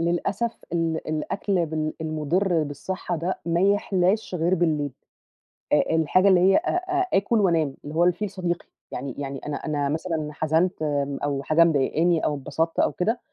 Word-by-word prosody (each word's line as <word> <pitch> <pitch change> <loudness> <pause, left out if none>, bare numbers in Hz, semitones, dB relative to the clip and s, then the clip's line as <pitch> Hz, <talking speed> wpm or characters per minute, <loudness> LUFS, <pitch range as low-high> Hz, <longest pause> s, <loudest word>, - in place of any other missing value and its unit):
للأسف 185 +7 0 0.2
ال 165 -2 -1
الأكل 175 +3 -1
بال 155 0 -2
المضر 160 +3 0
بالصحّة 170 +5 -4
ده 175 +4 -2
ما 170 0 +1
يحلاش 195 0 +1
غير 175 +1 +2
بالليل، 155 -5 0 0.8
آآ - - +4
الحاجة 165 +4 +3
اللي 190 -2 +6
هي 190 +2 +5
أ 345 - -1
أ 365 +1 0
آكل 210 +4 +2
وأنام 165 -8 +2
اللي 150 +2 -7
هو 170 - +4
الفيل 180 +4 +1
صديقي 175 -2 -3 0.3
يعني 130 0 -5
يعني 135 -1 -4
أنا 150 - -3
أنا 145 -2 -2
مثلًا 160 0 -2
حزنت 160 +3 0
آمم، 145 -2 -1
أو 140 -1 -1
حاجة 155 +4 +5
مضايقاني 160 +2 +2
أو 150 - +1
اتبسطت 150 +4 -2
أو - - +3
كده، 225 +7 -1
165 Hz, 165 wpm, -24 LUFS, 150-185 Hz, 0.8 s, اللي